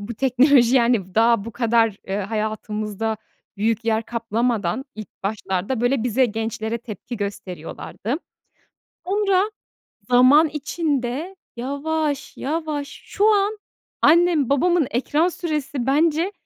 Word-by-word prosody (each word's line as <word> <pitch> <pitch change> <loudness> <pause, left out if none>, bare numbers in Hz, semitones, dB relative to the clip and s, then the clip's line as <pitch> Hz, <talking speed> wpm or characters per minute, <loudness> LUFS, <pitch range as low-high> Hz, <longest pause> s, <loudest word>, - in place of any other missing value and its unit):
bu 220 +3 -6
teknoloji, 260 0 +4
yani, 235 -2 +4
v 180 +1 -18
daha 230 -2 +3
bu 230 - -7
kadar, 230 -3 +2
eee, 195 +1 -2
hayatımızda 215 +1 -3 0.4
büyük 225 +2 0
yer 225 0 +1
kaplamadan 230 -1 -1
ilk 215 -1 -8
başlarda, 200 +3 -2
böyle, 245 -1 +1
bize 250 +2 +3
gençlere 220 +1 -3
tepki 235 +1 -8
gösteriyorlardı. 200 - -5 0.9
Sonra 395 +1 +1 0.6
zaman 260 +6 +6
içinde 300 +2 -2 0.2
yavaş 285 +3 -2
yavaş 300 -1 -3 0.2
şu 425 +2 +2
an 410 +1 +1 0.4
annem 330 -5 +4
babamın 340 +1 +3
ekran 295 +7 +1
süresi 300 -7 -3
bence, 320 +6 +2
245 Hz, 115 wpm, -22 LUFS, 220-305 Hz, 0.9 s, zaman